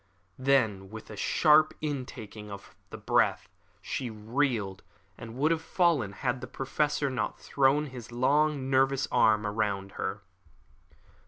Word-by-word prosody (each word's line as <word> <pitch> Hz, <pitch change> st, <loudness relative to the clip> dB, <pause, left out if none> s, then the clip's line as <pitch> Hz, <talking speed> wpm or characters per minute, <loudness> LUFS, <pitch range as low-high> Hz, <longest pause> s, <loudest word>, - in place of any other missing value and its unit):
Then 115 Hz, -8 st, +2 dB
with 110 Hz, +1 st, -10 dB
a -, -, -7 dB
sharp 155 Hz, -, +4 dB
intaking 120 Hz, -8 st, -6 dB
of 100 Hz, 0 st, -10 dB, 0.2 s
the -, -, -8 dB
breath -, -, +1 dB, 0.4 s
she 130 Hz, -3 st, -3 dB
reeled, 110 Hz, -3 st, -1 dB, 0.3 s
and 115 Hz, 0 st, -9 dB
would 150 Hz, +5 st, +2 dB
have 165 Hz, -1 st, +1 dB
fallen 160 Hz, -, +1 dB
had 125 Hz, +4 st, -2 dB
the 125 Hz, -, -6 dB
Professor 145 Hz, +1 st, -1 dB
not 110 Hz, -5 st, -3 dB
thrown 140 Hz, +2 st, +2 dB
his 125 Hz, -4 st, -9 dB
long, 140 Hz, +3 st, +2 dB
nervous 135 Hz, 0 st, +2 dB
arm 105 Hz, -1 st, +4 dB
round 105 Hz, -2 st, -1 dB
her. 100 Hz, 0 st, -4 dB
130 Hz, 135 wpm, -29 LUFS, 105-140 Hz, 0.4 s, sharp